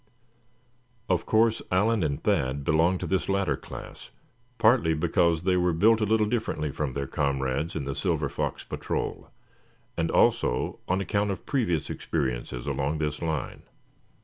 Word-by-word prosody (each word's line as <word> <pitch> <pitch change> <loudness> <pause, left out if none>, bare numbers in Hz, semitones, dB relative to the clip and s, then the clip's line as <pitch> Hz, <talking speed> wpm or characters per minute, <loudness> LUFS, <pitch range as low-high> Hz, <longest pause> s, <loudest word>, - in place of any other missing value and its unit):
Of 90 -2 0
course 110 0 +3
Allan 105 +4 +2
and 70 -4 -1
Thad 65 +2 +1
belonged 80 +5 +2
to - - -2
this 95 0 -1
latter 95 -7 +1
class, - - -10 0.5
partly 110 -8 +4
because 85 +1 +2
they 95 0 +2
were 90 -1 +2
built 110 +7 +4
a - - +3
little 110 0 +3
differently 105 - -1
from 70 -1 -3
their 70 +1 -2
comrades 70 +3 -1
in 75 -4 -3
the 70 - -2
Silver 80 -1 0
Fox - - -3
Patrol; - - -4 0.7
and 80 -1 0
also - - +2
on 95 +2 +1
account 100 +1 0
of 95 - -4
previous 100 - 0
experiences 65 -5 -3
along 70 +3 -1
this 75 -1 -2
line. 80 -5 -3
80 Hz, 150 wpm, -27 LUFS, 70-100 Hz, 0.7 s, partly